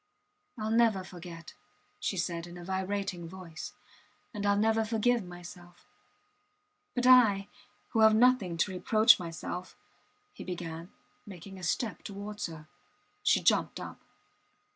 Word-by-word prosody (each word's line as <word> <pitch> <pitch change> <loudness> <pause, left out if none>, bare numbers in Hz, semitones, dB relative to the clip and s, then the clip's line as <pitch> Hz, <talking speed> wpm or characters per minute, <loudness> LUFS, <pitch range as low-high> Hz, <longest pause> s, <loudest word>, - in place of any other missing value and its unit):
Ill 215 0 -2
never 225 -4 +3
forget, 175 -2 -10 0.5
she 195 - -2
said 170 -1 -2
in 175 0 -10
a 175 - -9
vibrating 190 -2 -3
voice. 175 -3 -8 0.6
And 205 -2 -4
Ill 200 0 +4
never 220 +2 +2
forgive 225 +1 +1
myself.... 175 0 -12 1.1
But 245 0 0
I, 220 -6 +6 0.4
who 225 - 0
have 220 0 +7
nothing 225 -7 +3
to 190 +4 +1
reproach 215 +5 +5
myself... 175 +1 -6 0.6
He - - -9
began, 170 -1 -6 0.4
making 190 0 -10
a - - -11
step 220 +6 -1
towards 205 +1 -5
her. 155 -2 -10 0.5
She - - +3
jumped - - +2
up. - - -8
190 Hz, 130 wpm, -30 LUFS, 175-215 Hz, 1.1 s, have